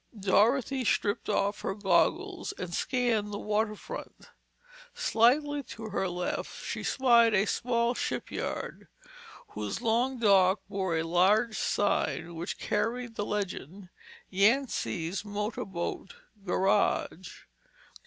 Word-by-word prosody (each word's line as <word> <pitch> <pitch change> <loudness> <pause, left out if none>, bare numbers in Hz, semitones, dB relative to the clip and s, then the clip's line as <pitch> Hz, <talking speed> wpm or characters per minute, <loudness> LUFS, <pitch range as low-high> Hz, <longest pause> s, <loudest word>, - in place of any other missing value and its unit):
Dorothy 235 +7 +2
stripped 205 -2 0
off 205 0 0
her 195 - -2
goggles 325 - +1
and 180 -1 -6
scanned 235 -2 0
the 205 - -3
waterfront. 215 - -4 0.6
Slightly 285 +6 +2 0.2
to 220 -1 -6
her 195 -1 -1
left 180 0 -4
she - - -3
spied 235 -4 +4
a 195 +1 +3
small 235 +1 0
shipyard, - - -4 0.6
whose 105 - -4
long 245 +3 +1
dock 195 -3 +4
bore 190 -4 -1
a 160 - 0
large 200 +7 +3
sign 200 -5 0
which 170 +2 -5
carried 230 +3 -2
the 205 -2 -3
legend: 195 -2 -4 0.4
"Yancy's 200 -4 +1
Motor 210 +1 -3
Boat 180 0 -5 0.3
Garage." 190 -1 0
210 Hz, 110 wpm, -29 LUFS, 190-235 Hz, 0.6 s, spied